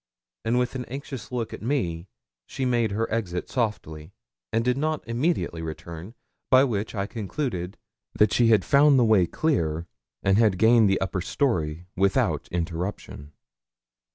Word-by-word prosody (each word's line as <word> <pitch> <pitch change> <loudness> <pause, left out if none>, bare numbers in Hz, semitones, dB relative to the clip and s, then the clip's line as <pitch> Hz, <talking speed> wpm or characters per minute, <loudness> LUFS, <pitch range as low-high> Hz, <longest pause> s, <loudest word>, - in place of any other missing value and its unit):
And 115 +2 +1
with 125 0 0
an 130 -1 -4
anxious 135 -1 -7
look 120 -3 -3
at - - -8
me, 100 - -2 0.4
she 130 - -3
made 120 -3 +1
her 110 +3 -1
exit, 90 -6 -2
softly, 90 -9 -3 0.4
and 115 +1 0
did 125 0 +2
not 155 +1 -2
immediately 120 - -1
return, 85 +5 -8 0.3
by 130 0 +6
which 110 -4 -2
I 100 -1 -1
concluded 105 -3 -4 0.4
that 105 0 +3
she 120 - +4
had 110 -4 +4
found 140 0 +5
the 125 - +4
way 105 -6 +4
clear, 85 - -1 0.4
and 95 +2 +3
had 105 -5 +3
gained 110 0 +5
the 95 - +2
upper 95 -1 -2
story 85 - -1
without 95 +1 +1
interruption. 85 -3 -4
110 Hz, 155 wpm, -25 LUFS, 90-125 Hz, 0.4 s, by